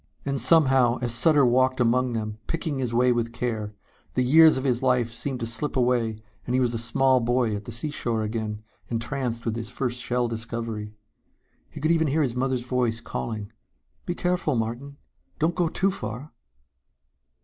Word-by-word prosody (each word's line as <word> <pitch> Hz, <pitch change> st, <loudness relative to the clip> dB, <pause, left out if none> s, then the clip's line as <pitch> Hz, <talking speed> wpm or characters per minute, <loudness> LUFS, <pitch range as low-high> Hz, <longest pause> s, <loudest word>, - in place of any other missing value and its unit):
And 140 Hz, -1 st, -1 dB
somehow, 130 Hz, -7 st, +5 dB
as 120 Hz, -1 st, +2 dB
Sutter 140 Hz, +3 st, +5 dB
walked 130 Hz, +1 st, +2 dB
among 125 Hz, +1 st, +2 dB
them, 110 Hz, -1 st, -4 dB
picking 160 Hz, -4 st, -2 dB
his 125 Hz, -3 st, -1 dB
way 125 Hz, +1 st, +3 dB
with 115 Hz, -1 st, -1 dB
care, 110 Hz, -3 st, -3 dB, 0.4 s
the 125 Hz, -, +2 dB
years 155 Hz, +3 st, +6 dB
of 130 Hz, -, -3 dB
his 125 Hz, -2 st, +1 dB
life 125 Hz, -3 st, +1 dB
seemed 130 Hz, +2 st, -2 dB
to -, -, -1 dB
slip 120 Hz, +6 st, -2 dB
away 120 Hz, -3 st, +1 dB, 0.3 s
and 125 Hz, -, 0 dB
he -, -, +3 dB
was 125 Hz, -2 st, +1 dB
a 115 Hz, -, -2 dB
small 130 Hz, +3 st, +3 dB
boy 120 Hz, -2 st, +1 dB
at 100 Hz, 0 st, -7 dB
the -, -, -7 dB
seashore 115 Hz, -3 st, -2 dB
again, 110 Hz, -1 st, -4 dB, 0.3 s
entranced 115 Hz, 0 st, -3 dB
with 115 Hz, -1 st, -1 dB
his 115 Hz, -1 st, -5 dB
first 125 Hz, 0 st, -3 dB
shell 125 Hz, -1 st, 0 dB
discovery. 115 Hz, -2 st, -5 dB, 0.7 s
He -, -, -9 dB
could 155 Hz, +3 st, +1 dB
even 160 Hz, -1 st, +2 dB
hear 150 Hz, +3 st, +2 dB
his 125 Hz, -4 st, -1 dB
mother's 130 Hz, 0 st, -1 dB
voice 125 Hz, -3 st, 0 dB
calling 110 Hz, -2 st, -5 dB, 0.6 s
"Be 175 Hz, -, -2 dB
careful, 180 Hz, -6 st, 0 dB
Martin! 120 Hz, +5 st, -4 dB, 0.4 s
Don't 160 Hz, +3 st, +1 dB
go 175 Hz, -2 st, 0 dB
too 195 Hz, +4 st, +1 dB
far!" 135 Hz, -, -6 dB
125 Hz, 180 wpm, -25 LUFS, 115-135 Hz, 0.7 s, years